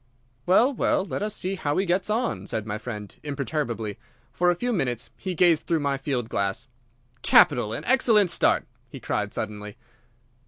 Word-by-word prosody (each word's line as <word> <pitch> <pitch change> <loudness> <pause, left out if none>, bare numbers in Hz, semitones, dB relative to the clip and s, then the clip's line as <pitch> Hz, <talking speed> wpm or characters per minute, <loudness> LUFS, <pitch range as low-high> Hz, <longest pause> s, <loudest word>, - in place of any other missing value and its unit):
"Well, 235 +10 +4
well, 195 - +1
let - - -4
us 210 0 -2
see 185 +2 -2
how 150 -6 -2
he 195 - +1
gets 185 +2 0
on," 230 +3 -1
said 110 -3 -3
my 105 0 -4
friend, 105 -3 -7
imperturbably. 140 -7 -3 0.3
For 180 0 +2
a 175 - +3
few 245 +7 -2
minutes 125 - -2
he 185 -1 -5
gazed 170 -2 +3
through 165 -2 +1
my 140 -1 -1
field 125 -5 -2
glass. 100 +1 -2 0.6
"Capital! 110 -3 +5
An - - -5
excellent 225 -7 +4
start!" - - +2 0.2
he - - -9
cried - - -2
suddenly. 105 +1 -5
150 Hz, 170 wpm, -25 LUFS, 115-190 Hz, 0.6 s, Capital